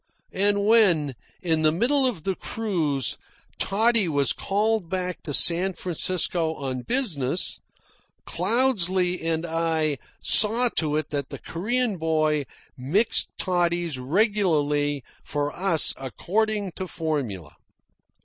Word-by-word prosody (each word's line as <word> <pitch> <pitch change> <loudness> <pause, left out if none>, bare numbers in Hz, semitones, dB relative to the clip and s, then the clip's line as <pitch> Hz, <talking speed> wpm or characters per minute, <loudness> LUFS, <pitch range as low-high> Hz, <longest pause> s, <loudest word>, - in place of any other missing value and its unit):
And 200 +1 +1
when, 185 - +3 0.3
in 160 -3 +1
the 155 -1 +4
middle 260 - +2
of 200 -11 -4
the 195 - -1
cruise, 165 - -2 0.4
Toddy 220 0 +2
was 145 -4 +1
called 210 -2 -1
back 180 -1 -3
to 150 - -6
San 175 +6 +3
Francisco 175 -2 -1
on 130 -3 -4
business, 175 - 0 0.7
Cloudesley 185 -8 +2
and 165 0 -1
I 160 -3 -1 0.2
saw 230 +3 +3
to 150 -2 +1
it 155 0 -2
that 140 -2 -3
the - - -7
Korean 225 +4 -2
boy 155 -2 0 0.3
mixed 175 - +1
toddies 175 -5 -1
regularly 150 - 0 0.2
for 145 0 -3
us 175 -3 +5
according 205 - -2
to 185 - -4
formula. 135 - -4
170 Hz, 115 wpm, -24 LUFS, 150-205 Hz, 0.7 s, us